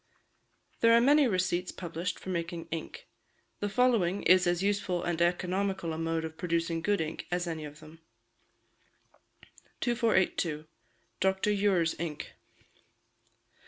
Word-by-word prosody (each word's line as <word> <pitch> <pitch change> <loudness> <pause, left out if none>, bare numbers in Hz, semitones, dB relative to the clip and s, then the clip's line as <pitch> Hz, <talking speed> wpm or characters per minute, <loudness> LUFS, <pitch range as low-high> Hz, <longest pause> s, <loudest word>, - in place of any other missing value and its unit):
There 230 0 +5
are 230 - +7
many 285 +3 +5
receipts 185 -3 0
published 170 0 -4
for - - -9
making 170 -1 -3
ink; 460 - -6 0.5
the 205 - -1
following 205 -6 +2
is 180 +1 +5
as 175 +1 +1
useful 195 -3 0
and 170 -1 -1
economical 180 0 0
a - - -4
mode 165 0 -1
of 160 0 -8
producing 165 -1 -1
good 205 +3 +1
ink 160 0 -4
as 175 0 -1
any 160 -2 -4
of 150 +1 -11
them: 155 +1 -14 1.8
2482. 190 -10 +1 0.5
Dr. 190 +2 +1
Ure's 195 -5 +2
Ink. 160 -3 -5
180 Hz, 125 wpm, -30 LUFS, 165-200 Hz, 1.8 s, are